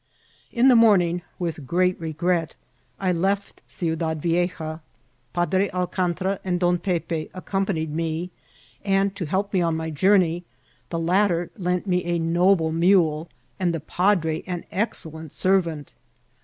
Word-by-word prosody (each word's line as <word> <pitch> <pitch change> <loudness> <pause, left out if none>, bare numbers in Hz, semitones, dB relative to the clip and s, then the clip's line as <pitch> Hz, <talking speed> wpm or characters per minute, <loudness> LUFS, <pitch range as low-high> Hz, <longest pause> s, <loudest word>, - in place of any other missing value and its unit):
In 245 +2 +3
the 255 - +7
morning, 185 -7 +4 0.2
with 160 -6 -4
great 180 +3 +2
regret, 165 +1 -1 0.4
I 185 -2 +1
left 195 +3 -1
Ciudad 160 -2 -2
Vie<* 175 +3 +1
ja. 155 -1 -5 0.5
Padre 185 +4 +1
Alcantra 185 +1 -1
and 180 -2 -1
Don 175 0 +2
Pepe 170 -3 -2
accompanied 185 -4 -2
me, 165 +2 -2 0.5
and, 195 0 +1
to 180 - -3
help 195 +5 -1
me 185 - +3
on 165 -2 +1
my 160 0 -3
journey, 175 +1 +3 0.5
the 165 - -3
latter 175 +1 +1
lent 180 -3 -1
me 180 -2 +1
a 175 0 0
noble 170 0 +2
mule, 165 -2 +3 0.3
and 175 -2 +1
the - - -2
padre 165 0 +1
an 180 -2 -4
excellent 160 -7 -4
servant. 170 -6 0
175 Hz, 140 wpm, -24 LUFS, 165-190 Hz, 0.5 s, the